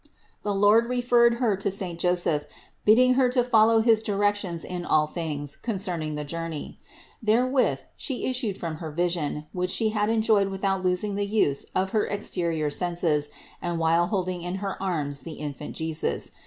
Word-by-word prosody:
The 205 -1 -1
Lord 210 +4 +5
referred 240 -1 +4
Her 235 -4 +1
to 200 +1 -1
saint 185 -3 -3
Joseph, 175 -4 +1 0.4
bidding 255 +4 +6
Her 255 -1 +3
to 250 0 +2
fol 225 -3 +5
low 225 0 +4
his 225 -1 +4
directions 205 -5 -1
in 180 -1 -5
all 155 -2 +3
things 150 -3 -4
concerning 180 -8 -3
the 150 - -3
journey. 165 0 -6 0.4
Therewith 250 +4 +2
She 265 -4 -4
issued 250 -6 -2
from 165 -3 -4
her 160 -1 -6
vision, 160 -2 -1
which 180 0 -1
She 220 +3 +1
had 210 -1 0
enjoyed 220 -3 +3
without 195 0 -1
losing 185 +3 0
the 200 0 -1
use 200 -10 +1
of 190 +1 0
her 215 - +1
exterior 170 -7 -2
senses 165 -3 0 0.3
and 175 -1 -2
while 165 +1 +3
holding 185 -2 -2
in 175 +2 -4
her 195 0 -4
arms 150 -7 -2
the 160 +4 -7
Infant 150 -1 -6
Jesus. 160 - -2
185 Hz, 170 wpm, -26 LUFS, 165-215 Hz, 0.4 s, bidding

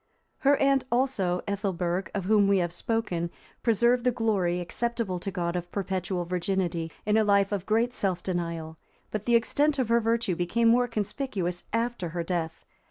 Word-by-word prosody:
Her 280 0 +4
aunt 275 -1 +3
also, 225 -8 +1
Ethelberg, 190 -3 -1
of 195 -3 -2
whom 205 0 +4
we 200 0 +4
have 175 -2 0
spoken, 175 -4 -1 0.3
preserved 235 +2 +3
the 250 - +4
glory, 200 -7 0
acceptable 225 +1 -2
to 195 - -4
God, 175 -2 -2
of 175 0 -4
perpetual 185 -2 -2
virginity, 175 -2 -1
in 210 +1 +3
a 220 - +4
life 200 -1 +3
of 200 -3 -3
great 230 +3 +2
self 185 -6 -1
denial, 165 -3 -3 0.3
but 215 -1 -3
the 240 - +4
extent 285 +6 +2
of 255 -4 0
her 235 0 +5
virtue 230 -4 0
became 225 +7 +2
more 245 +1 +4
conspicuous 210 -5 -3
after 230 -5 -1
her 170 +1 -3
death. 165 -2 -3
200 Hz, 170 wpm, -27 LUFS, 175-230 Hz, 0.3 s, her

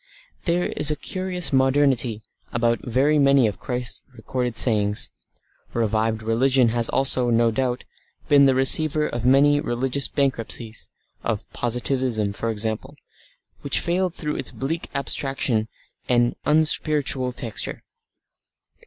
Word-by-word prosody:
There 175 +1 +1
is 150 - +2
a 150 - 0
curious 185 -1 -4
modernity 130 -4 +1 0.3
about 120 -1 0
very 135 +5 +1
many 140 -2 +4
of 105 -2 -2
Christ's 125 -2 -4
recorded 125 0 -4
sayings. 105 -3 +2 0.6
Revived 110 -1 0
religion 125 +2 +2
has 115 0 -1
also, 130 -2 +3
no 115 0 +2
doubt, 125 +1 -2 0.4
been 140 -2 +5
the 135 - +3
receiver 150 +3 +4
of 120 +1 -3
many 145 +2 +4
religious 135 0 -1
bankruptcies, 115 -5 -1 0.3
of - - -3
Positivism 120 -3 -1
for 115 +3 -3
example, 110 +5 -3 0.6
which 140 - +2
failed 180 0 -1
through 150 -2 -4
its 135 - 0
bleak 160 +5 -4
abstraction 135 -5 -1 0.4
and 120 -1 +3
an - - -10 0.2
unspiritual 150 -4 +1
texture. 115 -4 -4
130 Hz, 125 wpm, -22 LUFS, 115-140 Hz, 0.6 s, been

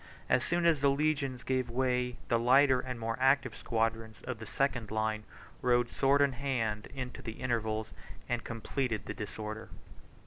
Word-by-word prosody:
As 125 - +4
soon 175 0 +1
as 160 -5 +4
the 140 - +5
legions 140 -3 0
gave 130 -2 0
way, 125 0 0
the 115 - +2
lighter 130 +2 +5
and 125 -1 -5
more 115 0 -1
active 135 -2 +3
squadrons 115 -1 -1
of 125 -3 -4
the 110 - -8
second 125 -5 0
line 110 0 -1 0.4
rode 120 -1 +3
sword 140 +1 +3
in 140 - +3
hand 120 -6 -1
into 125 -2 -5
the 115 - -5
intervals, 110 -3 -1 0.4
and 120 -1 -1
completed 115 -1 -2
the - - -4
disorder. 110 +1 -6
125 Hz, 165 wpm, -32 LUFS, 110-135 Hz, 0.4 s, the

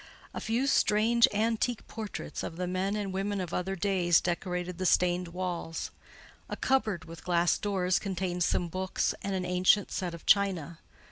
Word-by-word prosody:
A - - -5
few 235 +4 0
strange, 230 -2 +4
antique 225 +2 0
portraits 220 -2 -6
of - - -5
the 180 - -2
men 185 +3 -1
and 200 -3 -3
women 195 +1 -1
of 180 -2 -4
other 190 +2 -1
days 180 -3 +3
decorated 180 0 -3
the 185 - -1
stained 180 0 +2
walls; 175 -2 -4 0.6
a - - -3
cupboard 215 -9 0
with 165 0 -11
glass 175 -1 +2
doors 185 -3 +1
contained 185 -2 -2
some 175 - +1
books 185 +2 -1
and 195 -1 -2
an 185 -1 -2
ancient 180 +3 +3
set 175 -2 -3
of 170 - -13
china. 180 -6 +2
185 Hz, 165 wpm, -29 LUFS, 175-205 Hz, 0.6 s, strange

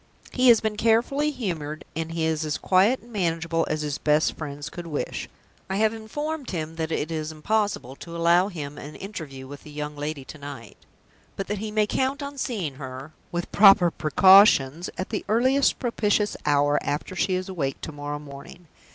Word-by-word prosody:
He 255 0 +2
has 235 -3 +7
been 215 -1 -2
carefully 240 +7 +2
humored, 170 - -4
and 165 0 -3
he 165 -1 -1
is 160 -1 0
as 155 -1 -2
quiet 200 +7 +3
and 235 0 -16
manageable 165 -3 0
as 155 0 -1
his 150 -1 -3
best 150 +1 +2
friends 145 -2 -6
could 175 -1 -8
wish. 150 -3 -4 0.4
I 190 - -1
have 215 +2 +2
informed 290 +7 -5
him 160 -2 -4
that 160 -1 -2
it 155 0 -2
is 155 -1 -3
impossible 190 - -1
to 170 0 -8
allow 170 +2 +4
him 150 -6 -7
an 150 +1 -9
interview 155 -10 -7
with 140 +1 -10
the - - -13
young 150 0 -5
lady 145 -1 -5
to 155 - -11
night; 140 -6 -9 0.6
but 195 - -3
that 205 -1 -2
he 215 +1 -4
may 215 0 +2
count 265 +6 -1
on 280 0 -6
seeing 195 - -2
her 130 +2 -8 0.2
(with 175 0 -1
the - - -8
proper 195 -4 +8
precautions) 175 -2 +5
at 185 - -4
the 215 - -3
earliest 260 +5 +3
propitious 210 -3 0
hour, 145 0 +3
after 150 +5 -3
she 185 +2 +1
is 185 +1 -3
awake 150 -8 -3
to - - -5
morrow 145 0 -5
morning. 145 +4 -11
170 Hz, 195 wpm, -25 LUFS, 150-210 Hz, 0.6 s, proper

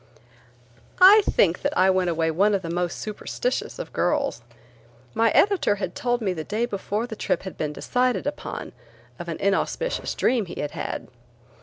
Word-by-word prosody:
I 395 +4 +9
think 175 -2 +2
that - - -1
I 190 +1 +5
went 185 -1 +1
away 160 -1 0
one 200 +6 +3
of 190 - -2
the 165 - -4
most 175 0 -1
superstitious 220 - -3
of - - -7
girls. 285 - 0 0.7
My 230 0 +3
editor 350 - +3
had 190 -3 -4
told 245 -1 -1
me 195 -4 0
the 160 -3 -5
day 215 +7 -1
before 210 0 -3
the 235 -2 -7
trip - - -1
had 190 - -7
been 150 -1 -2
decided 250 +8 0
upon 290 - -5 0.5
of 175 - -7
an 165 - -3
inauspicious 200 - -1
dream 235 -6 +1
he - - -8
had 145 - -3
had. - - -5
205 Hz, 175 wpm, -24 LUFS, 180-250 Hz, 0.7 s, I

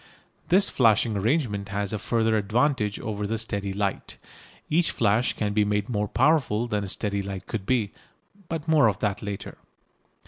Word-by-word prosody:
This 190 +3 +5
flashing 110 -2 +3
arrangement 105 -2 0
has 100 0 -2
a 105 - -2
further 115 0 +1
advantage 110 +1 +1
over 105 -1 -3
the 115 +2 -1
steady 100 -3 -2
light. 100 0 -3 0.5
Each 165 +2 +2
flash 115 +2 +1
can 105 -1 -2
be 105 0 +3
made 105 +1 -1
more 105 -3 -1
powerful 130 -4 +2
than 105 -4 -2
a - - -4
steady 100 0 -2
light 95 -1 -6
could 105 -4 -5
be. 115 -6 +1 0.6
But 165 -1 -4
of 140 -11 +4
that 105 -2 -2
more 105 - -7
later. 100 - -8
105 Hz, 170 wpm, -25 LUFS, 100-120 Hz, 0.6 s, This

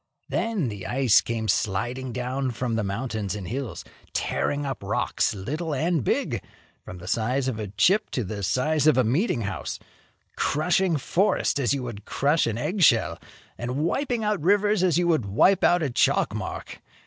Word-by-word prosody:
Then 210 - -1
the 100 -3 -6
ice 125 -4 +4
came 115 -1 -3
sliding 120 +7 -1
down 130 +2 -2
from 120 0 -3
the 110 -1 0
mountains 105 -1 -3
and 100 -4 -6
hills, 115 -7 -5 0.3
tearing 145 0 -1
up 135 -2 -4
rocks - - 0
little 150 - -3
and 160 0 0
big, - - -1 0.4
from 90 - -9
the 90 - -11
size 125 +5 0
of 120 -4 -2
a 105 - -3
chip 140 - +2
to 125 - -2
the 100 +1 -5
size 150 +9 +1
of 150 -5 +5
a 130 - +5
meeting 130 - +1
house, 100 -2 -4 0.6
crushing 175 +2 +1
forests 185 +3 +1
as 140 +1 +1
you 135 - -4
would 105 -4 -7
crush 145 +2 +1
an 115 -1 -2
egg 170 - -2
shell, 120 -9 +4 0.4
and 125 +2 -3
wiping 235 - 0
out 210 -4 0
rivers 205 +3 +3
as 180 -3 +3
you 175 0 +2
would 155 -11 +1
wipe 185 - +3
out 175 -1 +4
a 145 - 0
chalk 120 - +2
mark. - - -6
130 Hz, 180 wpm, -25 LUFS, 110-165 Hz, 0.6 s, of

